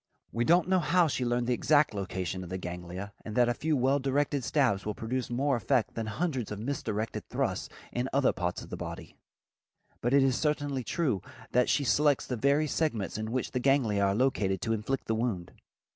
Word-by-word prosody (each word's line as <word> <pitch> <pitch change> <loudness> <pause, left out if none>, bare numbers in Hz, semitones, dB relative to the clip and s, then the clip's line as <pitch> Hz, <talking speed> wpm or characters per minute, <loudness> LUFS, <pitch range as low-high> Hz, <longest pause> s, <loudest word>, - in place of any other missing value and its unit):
We 120 +1 0
don't 175 +3 +4
know 185 0 +3
how 175 +2 +3
she 130 -3 -1
learned 120 0 0
the 125 - +1
exact 145 +1 +3
location 95 -2 -3
of 90 - -9
the 95 - -3
ganglia 90 +2 -6
and 110 - -6
that 120 -1 +4
a 120 - +2
few 155 +3 0
well 135 +3 +3
directed 140 0 0
stabs 115 -4 +2
will 105 -1 -3
produce 125 +2 -3
more 135 +3 +1
effect 120 0 +1
than 115 -1 -3
hundreds 130 - -2
of 105 - -3
misdirected 110 -2 -3
thrusts - - -1 0.2
in 125 +2 -2
other 135 -1 +3
parts 90 -2 -3
of - - -13
the - - -3
body, - - -7 0.9
but 120 - 0
it 140 0 +5
is 130 -2 +3
certainly 145 -3 -1
true 130 - 0 0.3
that 125 0 +3
she 145 - +2
selects 145 +1 +3
the 125 - -3
very 140 +6 +2
segments 145 -9 -1
in 110 +1 -3
which 130 0 -2
the 125 - -1
ganglia 125 -6 +2
are 100 0 +2
located 105 -6 +1
to 115 - +1
inflict 115 +5 -2
the 110 - 0
wound. 110 -7 -2
125 Hz, 205 wpm, -29 LUFS, 105-140 Hz, 0.9 s, it